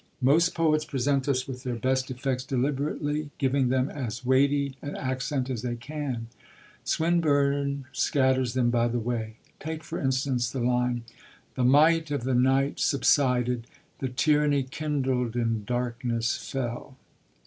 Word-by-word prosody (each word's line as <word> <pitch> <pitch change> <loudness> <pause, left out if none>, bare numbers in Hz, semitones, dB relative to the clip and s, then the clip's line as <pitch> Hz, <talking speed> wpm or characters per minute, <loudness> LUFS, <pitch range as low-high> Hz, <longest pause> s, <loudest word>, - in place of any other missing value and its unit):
Most 165 +6 +4
poets 155 -2 +2
present 140 -2 0
us 130 -2 0
with 130 -2 -6
their 125 -2 -3
best 130 +3 0
effects 130 0 -2
deliberately, 145 +3 -1
giving 135 -2 +1
them 130 +1 +2
as 125 -4 -5
weighty 140 +1 +2
an 145 - -5
accent 130 0 -2
as 125 -4 -3
they 120 -1 -2
can; 135 -2 -4 0.6
Swinburne 140 -4 +1
scatters 130 -4 +1
them 120 -2 +2
by 120 -1 +2
the 120 +1 -1
way. 115 -1 -3 0.2
Take, 160 0 -5
for 170 - -5
instance, 130 -2 0
the 135 - -4
line: 125 0 +1 0.5
The 130 - -1
might 155 +4 +5
of 145 -4 -2
the 130 +1 0
night 135 +3 +2
subsided: 125 -4 +2 0.3
the 130 - -2
tyranny 145 +2 +2
kindled 130 -4 -2
in 115 -3 -1
darkness 120 -1 -1
fell. 130 0 -4
130 Hz, 140 wpm, -27 LUFS, 125-145 Hz, 0.6 s, might